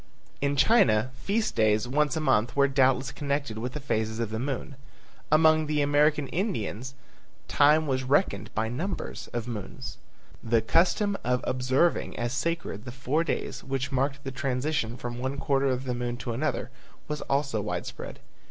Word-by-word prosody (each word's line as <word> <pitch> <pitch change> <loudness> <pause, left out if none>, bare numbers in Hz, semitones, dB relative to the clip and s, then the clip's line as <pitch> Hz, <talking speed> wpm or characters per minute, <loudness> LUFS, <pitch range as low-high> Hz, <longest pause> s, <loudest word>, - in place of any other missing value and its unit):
In 140 0 +1
China 140 - +4
feast 215 +10 -1
days 110 +1 +3
once 150 +4 +1
a - - +1
month 120 -6 +2
were 140 0 +5
doubtless 135 -1 +2
connected 140 -6 -2
with 125 +3 -4
the 150 - -4
phases 110 -4 -1
of 115 -2 -2
the 110 - -2
moon. 135 +2 -3 0.6
Among 155 0 +5
the 150 -1 +1
American 145 0 +3
Indians 135 - -3 0.5
time 150 +2 +4
was 130 -3 0
reckoned 140 +9 +1
by 110 +1 +1
numbers 165 - -4
of 120 -1 -3
moons. 110 -5 -6 0.4
The 115 0 +3
custom 195 - +2
of 125 0 +1
observing 130 +6 +1
as 120 +1 -2
sacred 165 -7 -2
the 120 - -6
four 135 +5 0
days, 170 - -3
which 135 -1 -2
marked 135 +1 -1
the 135 - -4
transition 130 -2 -1
from 120 -1 -5
one 130 +2 -2
quarter 135 0 +1
of 130 -1 0
the 125 -2 -2
moon 120 0 -3
to 120 -1 -4
another, 130 0 -2 0.4
was 150 -1 -3
also 140 -5 +1
widespread. 105 - -5
135 Hz, 165 wpm, -27 LUFS, 120-150 Hz, 0.6 s, were